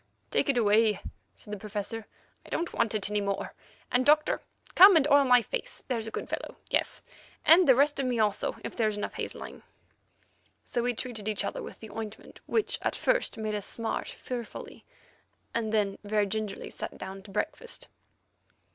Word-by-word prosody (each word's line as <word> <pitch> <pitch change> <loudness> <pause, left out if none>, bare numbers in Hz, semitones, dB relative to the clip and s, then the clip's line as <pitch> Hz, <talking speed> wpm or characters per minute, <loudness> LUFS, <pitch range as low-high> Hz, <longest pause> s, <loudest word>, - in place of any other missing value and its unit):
"Take - - +2
it 270 - +3
away," 215 -2 +4 0.4
said 210 - -10
the 210 - -4
Professor; 210 +1 -4 0.4
"I - - -15
don't 340 - -2
want 225 -2 +1
it 205 -2 0
any 210 0 +1
more, 200 -1 -2 0.4
and, 250 +1 +3
Doctor, 300 +2 +4 0.3
come 385 +1 +10
and 300 -3 +5
oil 285 -1 +7
my 250 -2 +6
face, - - -5
there's 230 -4 -1
a - - -5
good - - -4
fellow; - - -5 0.2
yes, - - 0 0.4
and 345 +3 +7
the 260 - +8
rest 285 +2 +3
of 270 - +1
me 245 -1 0
also, 210 -1 +1
if - - -5
there 220 -2 +2
is 210 - -4
enough 205 - -3
hazeline." - - -6 1.0
So 240 - -2
we 245 0 0
treated 220 -4 -5
each 210 -1 0
other - - -3
with - - -9
the 220 - -9
ointment, 220 -1 -8
which 445 - +1
at - - -1
first - - +1
made 215 -1 -2
us 205 -2 -3
smart 230 -1 -3
fearfully, 240 -3 -7 0.7
and 225 -2 -1
then, 205 -3 +1
very 210 0 +1
gingerly 210 0 -4
sat - - -6
down 190 +1 -7
to 200 - -14
breakfast. 480 - -3
225 Hz, 185 wpm, -29 LUFS, 210-260 Hz, 1.0 s, come